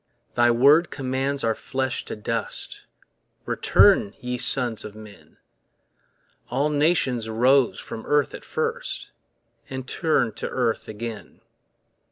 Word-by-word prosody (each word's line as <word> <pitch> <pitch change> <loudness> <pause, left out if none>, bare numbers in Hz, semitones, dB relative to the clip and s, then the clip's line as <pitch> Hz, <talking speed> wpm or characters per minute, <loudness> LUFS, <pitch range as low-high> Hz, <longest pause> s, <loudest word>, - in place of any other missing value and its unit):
Thy 120 0 +4
word 140 +8 +5
commands 135 +1 -2
our 115 - +2
flesh 130 +2 -3
to - - -5
dust, 110 +1 -4 0.6
Return, 100 - +4
ye 125 0 -3
sons 120 -4 +1
of 105 0 -9
men. 105 -1 -14 1.1
All 140 +4 +1
nations 145 -6 +1
rose 120 -1 +3
from 110 - -8
earth 145 -1 +2
at - - -8
first, 470 +1 -3 0.6
And 130 -1 -6
turn 140 -7 +1
to - - -4
earth 120 -3 -1
again. 110 0 -7
125 Hz, 120 wpm, -24 LUFS, 115-140 Hz, 1.1 s, word